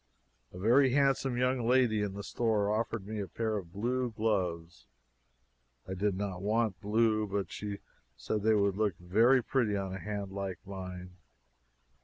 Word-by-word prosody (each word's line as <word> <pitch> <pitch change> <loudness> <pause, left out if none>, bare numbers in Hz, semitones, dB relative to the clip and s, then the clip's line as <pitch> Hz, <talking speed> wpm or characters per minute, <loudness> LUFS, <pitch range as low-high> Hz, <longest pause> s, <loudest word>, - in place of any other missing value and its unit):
A - - -11
very 125 +7 +4
handsome 135 -2 +2
young 125 +1 +1
lady 120 -2 +3
in 100 -2 -2
the 100 - -6
store 105 -3 0
offered 115 -2 -2
me 110 +1 -5
a 100 - -3
pair 110 +1 -2
of 90 -4 -7
blue 125 +6 -1
gloves. 90 -7 -2 1.0
I 95 - -4
did 95 0 0
not 95 -3 -3
want 110 -1 0
blue, 110 0 +2
but 100 0 -3
she 105 -1 -5 0.4
said 105 - -2
they 110 +1 +3
would 100 -2 +2
look 105 -5 0
very 115 +9 +4
pretty 110 -5 +1
on 95 -1 -3
a 95 - -5
hand 100 -2 -4
like 95 -2 -4
mine. 90 -2 -8
105 Hz, 165 wpm, -31 LUFS, 95-115 Hz, 1.0 s, very